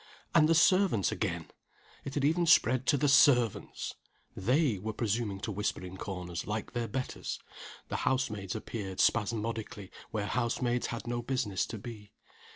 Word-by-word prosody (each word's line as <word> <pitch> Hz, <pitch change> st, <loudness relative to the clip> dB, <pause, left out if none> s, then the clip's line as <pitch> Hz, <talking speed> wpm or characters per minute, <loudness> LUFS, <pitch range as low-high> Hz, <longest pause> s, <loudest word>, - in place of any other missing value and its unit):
And 155 Hz, -2 st, +5 dB
the 165 Hz, -, +5 dB
servants 185 Hz, -, +4 dB
again! -, -, -3 dB, 0.5 s
it 140 Hz, -, -5 dB
had 140 Hz, -1 st, +1 dB
even 170 Hz, +3 st, +2 dB
spread 130 Hz, -5 st, +4 dB
to 145 Hz, -, +4 dB
the 145 Hz, -, +2 dB
servants! 130 Hz, -5 st, +3 dB, 0.4 s
They 125 Hz, -, +2 dB
were 110 Hz, +3 st, -4 dB
presuming 105 Hz, -2 st, -1 dB
to 110 Hz, -, -3 dB
whisper 100 Hz, -2 st, -2 dB
in 90 Hz, +1 st, -8 dB
corners, 90 Hz, -3 st, -5 dB
like 105 Hz, +2 st, -3 dB
their 120 Hz, -1 st, -1 dB
betters. 130 Hz, +1 st, -4 dB, 0.5 s
The -, -, -1 dB
house 130 Hz, -2 st, +1 dB
maids 100 Hz, -2 st, -5 dB
appeared, 100 Hz, -3 st, -5 dB
spasmodically, 110 Hz, -2 st, 0 dB, 0.2 s
where 105 Hz, -2 st, -2 dB
house 120 Hz, +2 st, -1 dB
maids 120 Hz, -1 st, 0 dB
had 115 Hz, -, -5 dB
no 120 Hz, 0 st, -2 dB
business 120 Hz, -6 st, -1 dB
to 110 Hz, -, -6 dB
be. 105 Hz, -1 st, -10 dB
115 Hz, 165 wpm, -31 LUFS, 105-130 Hz, 0.5 s, And